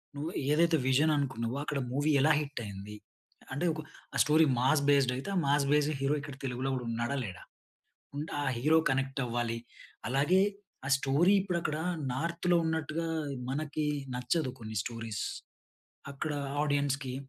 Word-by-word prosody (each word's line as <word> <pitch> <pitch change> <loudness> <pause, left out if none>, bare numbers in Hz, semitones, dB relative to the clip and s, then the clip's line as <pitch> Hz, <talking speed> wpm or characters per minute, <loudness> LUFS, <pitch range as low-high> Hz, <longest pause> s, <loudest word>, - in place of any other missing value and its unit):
నువ్వు 150 +4 -3 0.2
ఏదైతే 165 +2 +4
విజన్ 145 +4 +4
అనుకున్నావో, 125 -3 -2
అక్కడ 145 -1 -2
మూవీ 145 +4 +1
ఎలా 155 +3 +5
హిట్టయింది, 105 -8 -6 0.6
అంటే 145 +6 -1
ఒక 155 - -5 0.3
ఆహ్, - - +1
స్టోరీ 155 +2 +5
మాస్ 135 +4 +3
బేస్డ్ 140 -3 +4
అయితే 135 - -5
ఆహ్, 180 - +2
మాస్ 140 0 +3
బేస్డ్ 150 +1 +3
హీరో 135 +2 +2
ఇక్కడ 140 -1 -8
తెలుగులో 130 +1 -2
కూడా 125 -2 -4
ఉన్నాడా, 120 +4 -1
లేడా, 95 -2 -8 0.7
ఉంటే, 150 +2 -4
ఆ - - -1
హీరో 155 +6 +4
కనెక్ట్ 135 0 0
అవ్వాలి. 120 -1 -1 0.5
అలాగే 145 +9 +3 0.5
ఆహ్, 135 - +1
స్టోరీ 145 +8 +3
ఇప్పుడక్కడ 170 -5 -1 0.4
నార్త్‌లో 170 +5 +1
ఉన్నట్టుగా 160 +1 -1 0.4
మనకి 150 +2 -2 0.3
నచ్చదు 130 +4 0
కొన్ని 110 -1 -6
స్టోరీస్. 115 -2 -4 0.9
అక్కడ, 145 +3 -3 0.3
ఆడియన్స్‌కి 140 -3 0
140 Hz, 140 wpm, -31 LUFS, 125-155 Hz, 0.9 s, ఎలా